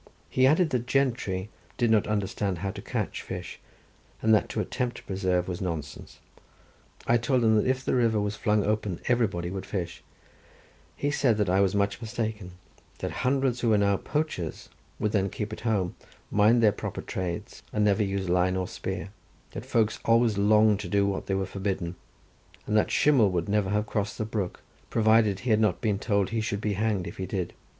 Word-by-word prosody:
He 130 Hz, 0 st, +4 dB
added 155 Hz, +3 st, +3 dB
that 120 Hz, -2 st, -1 dB
gentry 115 Hz, -8 st, 0 dB, 0.3 s
did 120 Hz, -2 st, +2 dB
not 110 Hz, -2 st, +3 dB
understand 100 Hz, -2 st, -1 dB
how 95 Hz, -, 0 dB
to -, -, -8 dB
catch -, -, -3 dB
fish, -, -, -7 dB, 0.6 s
and 110 Hz, 0 st, +3 dB
that 110 Hz, -, +3 dB
to -, -, -3 dB
attempt 125 Hz, -1 st, -2 dB
to -, -, -11 dB
preserve 95 Hz, -2 st, 0 dB
was 90 Hz, -2 st, -4 dB
nonsense. 80 Hz, -6 st, -5 dB, 0.9 s
I 120 Hz, -, +4 dB
told 120 Hz, +1 st, +1 dB
him 110 Hz, -1 st, +4 dB
that 105 Hz, -, +2 dB
if 130 Hz, 0 st, 0 dB
the -, -, +1 dB
river 115 Hz, -4 st, +3 dB
was 105 Hz, 0 st, -1 dB
flung 105 Hz, -1 st, +1 dB
open 105 Hz, -4 st, -1 dB
everybody 105 Hz, -8 st, +1 dB
would 95 Hz, 0 st, -5 dB
fish; 90 Hz, -5 st, -4 dB, 0.9 s
he 145 Hz, -, -1 dB
said 125 Hz, -7 st, +2 dB
that 105 Hz, -4 st, +1 dB
I 95 Hz, +1 st, +4 dB
was 100 Hz, 0 st, +2 dB
much 100 Hz, +2 st, 0 dB
mistaken, 110 Hz, -4 st, -4 dB, 0.4 s
that -, -, -4 dB
hundreds 130 Hz, -1 st, 0 dB
who 120 Hz, -, +1 dB
were 110 Hz, -, +4 dB
now 100 Hz, -1 st, +3 dB
poachers 145 Hz, -, -3 dB, 0.3 s
would 105 Hz, -1 st, 0 dB
then 100 Hz, -2 st, +1 dB
keep 105 Hz, +2 st, -5 dB
at -, -, -6 dB
home, 100 Hz, -6 st, 0 dB, 0.4 s
mind 110 Hz, +3 st, +4 dB
their 105 Hz, -, +6 dB
proper 100 Hz, -, -5 dB
trades, 90 Hz, -2 st, -5 dB
and 105 Hz, -1 st, +1 dB
never 105 Hz, +1 st, +3 dB
use 100 Hz, -2 st, -1 dB
line 90 Hz, +1 st, +2 dB
or 90 Hz, -1 st, -2 dB
spear; 95 Hz, 0 st, -5 dB, 0.4 s
that 120 Hz, -, -7 dB
folks 115 Hz, -4 st, +1 dB
always 115 Hz, -1 st, +3 dB
longed 105 Hz, +1 st, +4 dB
to 100 Hz, -4 st, -5 dB
do 100 Hz, +2 st, +3 dB
what 100 Hz, -1 st, -2 dB
they 95 Hz, -, 0 dB
were 95 Hz, 0 st, 0 dB
forbidden, 95 Hz, -3 st, -3 dB, 0.7 s
and 105 Hz, -, -1 dB
that 110 Hz, -, +3 dB
Shimei 140 Hz, -7 st, +4 dB
would 90 Hz, -3 st, -1 dB
never 100 Hz, -2 st, +1 dB
have 105 Hz, +1 st, +1 dB
crossed 105 Hz, -1 st, -2 dB
the 110 Hz, -, -2 dB
brook 105 Hz, -4 st, -4 dB, 0.3 s
provided 110 Hz, -3 st, +3 dB
he 125 Hz, -, -1 dB
had 110 Hz, -, +4 dB
not 110 Hz, -1 st, +2 dB
been 105 Hz, -4 st, 0 dB
told 100 Hz, -4 st, +1 dB
he 115 Hz, -1 st, 0 dB
should 100 Hz, -2 st, -2 dB
be 105 Hz, -1 st, -1 dB
hanged 105 Hz, -2 st, 0 dB
if -, -, -8 dB
he 95 Hz, -, -4 dB
did. 90 Hz, -2 st, -3 dB
105 Hz, 200 wpm, -27 LUFS, 95-115 Hz, 0.9 s, their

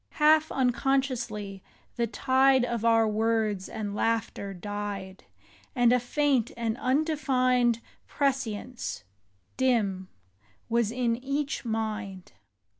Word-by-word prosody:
Half 310 Hz, +1 st, +4 dB
unconsciously, 245 Hz, -6 st, -1 dB, 0.3 s
the 235 Hz, -1 st, 0 dB
tide 260 Hz, +2 st, +3 dB
Of 235 Hz, -2 st, -3 dB
our 225 Hz, -1 st, +4 dB
words 215 Hz, -2 st, 0 dB
and 205 Hz, -2 st, -4 dB
laughter 225 Hz, -2 st, -1 dB
died; 200 Hz, 0 st, -6 dB, 0.5 s
And 245 Hz, 0 st, +4 dB
a 250 Hz, -, +4 dB
faint 260 Hz, -1 st, +1 dB
and 230 Hz, -2 st, -1 dB
undefined 255 Hz, -4 st, +1 dB, 0.3 s
Prescience, 255 Hz, -4 st, -2 dB, 0.5 s
dim, 205 Hz, -8 st, +1 dB, 0.6 s
was 235 Hz, -2 st, +1 dB
in 235 Hz, -1 st, 0 dB
each 280 Hz, +1 st, -2 dB
mind. 215 Hz, -4 st, -4 dB
235 Hz, 100 wpm, -28 LUFS, 210-260 Hz, 0.6 s, Half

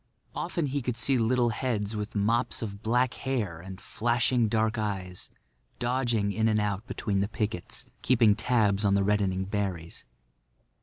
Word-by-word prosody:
Often 170 Hz, -, -2 dB
he 145 Hz, -, 0 dB
could 120 Hz, -1 st, -2 dB
see 125 Hz, +2 st, +2 dB
little 120 Hz, +1 st, +3 dB
heads 110 Hz, -3 st, -2 dB
with 105 Hz, +2 st, -4 dB
mops 115 Hz, +4 st, +1 dB
of 100 Hz, -2 st, -6 dB
black 125 Hz, +3 st, +2 dB
hair 115 Hz, -, -2 dB
and 95 Hz, +2 st, -9 dB
flashing 120 Hz, 0 st, +1 dB
dark 110 Hz, +1 st, +1 dB
eyes 95 Hz, -4 st, -4 dB, 0.5 s
dodging 120 Hz, -4 st, 0 dB
in 110 Hz, +2 st, +1 dB
and 110 Hz, -1 st, +3 dB
out 105 Hz, +1 st, -2 dB
between 105 Hz, -5 st, -1 dB
the 100 Hz, -, +1 dB
pickets, 105 Hz, -4 st, -3 dB, 0.2 s
keeping 115 Hz, -5 st, +4 dB
tabs 110 Hz, -3 st, +2 dB
on 100 Hz, -1 st, +3 dB
the 100 Hz, -, +3 dB
reddening 95 Hz, -2 st, +1 dB
berries. 95 Hz, -5 st, -3 dB
110 Hz, 155 wpm, -28 LUFS, 100-120 Hz, 0.5 s, keeping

